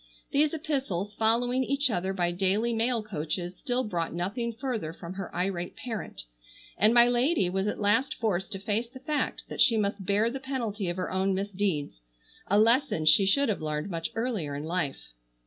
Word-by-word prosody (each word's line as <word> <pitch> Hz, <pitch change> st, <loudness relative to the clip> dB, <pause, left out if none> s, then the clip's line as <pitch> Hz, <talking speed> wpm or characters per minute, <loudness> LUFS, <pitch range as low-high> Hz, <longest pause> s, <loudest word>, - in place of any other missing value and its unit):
These 295 Hz, +1 st, +3 dB
epistles 270 Hz, -, -2 dB
following 240 Hz, +4 st, +2 dB
each 275 Hz, 0 st, +1 dB
other 190 Hz, -1 st, -1 dB
by 175 Hz, -2 st, 0 dB
daily 195 Hz, +6 st, +1 dB
mail 230 Hz, 0 st, +1 dB
coaches 175 Hz, -1 st, -3 dB
still 250 Hz, +4 st, -1 dB
brought 170 Hz, -7 st, -2 dB
nothing 205 Hz, +7 st, -2 dB
further 230 Hz, -, -3 dB
from 170 Hz, +1 st, -8 dB
her 195 Hz, -1 st, -6 dB
irate 180 Hz, -1 st, -2 dB
parent, 225 Hz, -4 st, -5 dB, 0.5 s
and 210 Hz, +2 st, +4 dB
my 240 Hz, 0 st, +7 dB
lady 245 Hz, -, +2 dB
was 190 Hz, +2 st, 0 dB
at -, -, -2 dB
last 255 Hz, +8 st, +2 dB
forced 190 Hz, -5 st, -1 dB
to 195 Hz, -, -4 dB
face 215 Hz, +3 st, -1 dB
the 260 Hz, +2 st, -12 dB
fact 295 Hz, +3 st, -2 dB
that -, -, -3 dB
she 230 Hz, -4 st, +6 dB
must 200 Hz, -1 st, -1 dB
bear 210 Hz, +3 st, +2 dB
the 270 Hz, -, -4 dB
penalty 230 Hz, -8 st, -3 dB
of 175 Hz, -, -3 dB
her 180 Hz, -, -3 dB
own 190 Hz, +1 st, +1 dB
misdeeds; 190 Hz, -, -2 dB, 0.5 s
a 200 Hz, -, +3 dB
lesson 230 Hz, -, +3 dB
she 175 Hz, +6 st, +6 dB
should 280 Hz, +8 st, +4 dB
have 205 Hz, -, -1 dB
learned 155 Hz, +4 st, -3 dB
much 165 Hz, -1 st, -2 dB
earlier 220 Hz, -, -2 dB
in 145 Hz, -, -4 dB
life. 160 Hz, -, -3 dB
205 Hz, 185 wpm, -28 LUFS, 180-240 Hz, 0.5 s, my